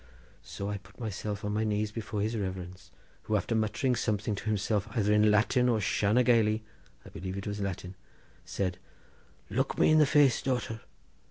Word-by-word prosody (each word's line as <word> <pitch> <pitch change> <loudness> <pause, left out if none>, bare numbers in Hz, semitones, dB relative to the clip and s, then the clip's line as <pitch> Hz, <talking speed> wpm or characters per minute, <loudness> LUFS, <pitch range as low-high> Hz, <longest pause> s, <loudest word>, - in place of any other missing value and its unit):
So 100 - -6
I 105 0 -2
put 100 +4 -20
myself 105 -1 -4
on 105 - -1
my 110 +1 0
knees 105 0 0
before 105 -1 -4
his 110 +2 -1
reverence, 95 -3 -5 0.3
who 110 - -1
after 105 +3 0
muttering 110 +4 +1
something 105 -1 -1
to 100 - -6
himself, 105 -1 0
either 105 -1 +3
in 105 0 +5
Latin 120 +4 +3
or 115 -2 +2
Shanna 105 +3 +2
Gailey—I 105 - 0
believe 95 +3 -6
it 100 - -5
was 105 0 -4
Latin, 95 -1 -4 0.5
said, 90 -2 -3 0.7
'Look - - 0
me - - +4
in 155 - +6
the 150 - +5
face, 145 -3 +4
daughter! 125 -4 -2
105 Hz, 175 wpm, -29 LUFS, 100-115 Hz, 0.7 s, in